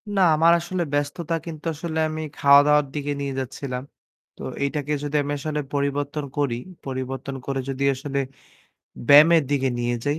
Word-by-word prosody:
না, 195 - +3
আমার 165 +2 +5
আসলে 175 +1 -2
ব্যস্ততা 145 +3 -1
কিন্তু 160 -2 -8
আসলে 160 +1 -4
আমি 155 0 -4 0.2
খাওয়া 140 0 +7
দাওয়ার 150 0 +4
দিকে 145 -1 -3
নিয়ে 140 -1 -3
যাচ্ছিলাম। 130 0 -5 0.5
তো - - -14 0.2
এইটাকে 145 +1 -2
যদি 145 +1 -3
আমি 145 - -4
আসলে 150 +1 -3
পরিবর্তন 145 +1 -1
করি, 140 -5 +1 0.3
পরিবর্তন 135 +1 -4
করে 135 -1 -2
যদি 135 0 -2
আসলে 140 +1 -3 0.9
ব্যায়ামের 155 +3 +8
দিকে 135 -2 +1
নিয়ে 120 0 0
যাই 145 +2 0
145 Hz, 160 wpm, -23 LUFS, 140-155 Hz, 0.9 s, ব্যায়ামের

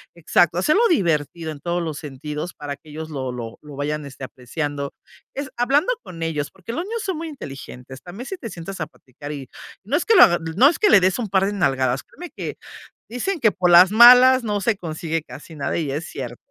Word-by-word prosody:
exacto, 170 0 +2
hacerlo 305 - +3
divertido 165 - 0
en 145 - -9
todos 175 +1 -2
los 155 -3 -4
sentidos 150 +3 -6
para 145 -1 -6
que 150 - -19
ellos 155 +1 -7
lo 130 -3 -4
lo 120 -2 -7
lo 150 -2 -11
vayan 150 +1 -3
este 135 -1 -11
apreciando, 140 +3 -5 0.4
es 280 -1 -5
hablando 275 - +2
con 165 -1 -8
ellos 150 -3 -2
porque 190 +4 -10
los 335 - -2
niños 450 +2 -4
son 375 -5 -3
muy 330 +1 -5
inteligentes 135 - -10
también 195 +8 -9
si 385 +6 -6
te 230 - -7
sientas 180 +1 -8
a 155 - -2
platicar 145 +3 -11
y 135 -3 -8 0.3
no 235 +9 -2
es - - -1
que 450 - +4
lo 370 - +10
hag 175 - +4 0.2
no 260 - +7
es 330 - -3
que 420 - +4
le 200 - +7
des 185 +4 +1
un 225 -4 -3
par 190 0 +2
de 205 - -2
nalgadas, 135 -8 0
créeme 355 -1 -11
que, - - -6 0.5
dicen 320 - -3
que 225 - +4
por 180 -2 +1
las 180 +3 +8
malas 250 +2 +8
no 210 -2 -1
se 220 +1 +1
consigue 165 -2 -4
casi 160 +1 -12
nada 145 +2 -2
y 155 -4 -2
es 150 +4 -3
cierto. 120 -3 -7
170 Hz, 225 wpm, -22 LUFS, 145-235 Hz, 0.5 s, lo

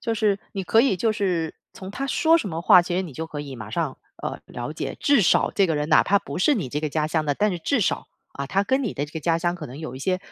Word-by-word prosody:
就 230 -3 -1
是 205 -2 +1
你 195 - -3
可 225 +5 +4
以 270 - +3
就 220 +4 +1
是 180 -6 -1 0.2
从 190 0 -9
他 275 +6 -4
说 325 +4 +4
什 265 - -4
么 165 -1 -4
话， 185 -2 +8
其 175 0 -3
实 - - +2
你 165 -6 -8
就 160 +3 -4
可 150 -2 -6
以 140 -3 -7
马 110 -1 -8
上， 160 -3 -2 0.3
呃， - - -4
了 - - -6
解， - - -4
至 285 -5 +4
少 165 - +3
这 195 -2 +2
个 160 - 0
人 150 0 -1
哪 155 - +6
怕 200 0 +3
不 140 - -7
是 285 +11 +4
你 180 - -2
这 150 +4 -3
个 155 - -1
家 155 0 0
乡 155 0 0
的， 145 -1 0
但 210 +6 +1
是 180 - -3
至 260 - 0
少， 180 - 0 0.3
啊， 140 0 -5
他 195 +7 +1
跟 265 +5 +1
你 220 - -2
的 145 - -2
这 150 - -16
个 160 - -5
家 165 +1 +1
乡 175 +1 0
可 165 -4 -7
能 130 +4 -10
有 155 -5 -6
一 - - -7
些， 185 +6 0
175 Hz, 330 characters per minute, -24 LUFS, 155-205 Hz, 0.3 s, 话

